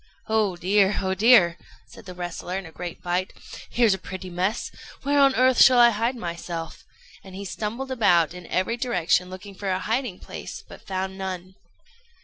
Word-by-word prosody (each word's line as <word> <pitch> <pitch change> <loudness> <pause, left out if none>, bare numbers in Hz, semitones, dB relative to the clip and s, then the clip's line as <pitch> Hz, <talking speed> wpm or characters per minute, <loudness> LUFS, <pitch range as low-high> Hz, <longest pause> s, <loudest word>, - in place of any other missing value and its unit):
"Oh 215 -4 +1
dear! 195 +3 +2
oh 190 0 0
dear!" 190 -4 +5 0.3
said 230 - -15
the 180 - -8
wrestler, 175 +1 -5
in 195 - -6
a 165 - -11
great 175 +1 -8
fright; 180 +1 -1 0.4
"here's 235 -4 +3
a 190 - -4
pretty 185 0 -8
mess! 185 +6 -2 0.3
Where 285 +1 +2
on 275 -1 +5
earth 255 -1 +4
shall 255 -1 +8
I 240 0 +7
hide 230 +4 -1
myself?" 170 -4 -6 0.4
and 190 -1 -12
he 200 +1 -6
stumbled 225 +8 -4
about 175 - +3
in 180 -1 -10
every 185 +6 -1
direction 180 -7 +1
looking 185 +2 -9
for 195 +1 -5
a 185 - +1
hiding 225 0 -2
place, - - -9
but - - -14
found 190 0 -4
none. 185 -1 -5
190 Hz, 180 wpm, -24 LUFS, 180-230 Hz, 0.4 s, shall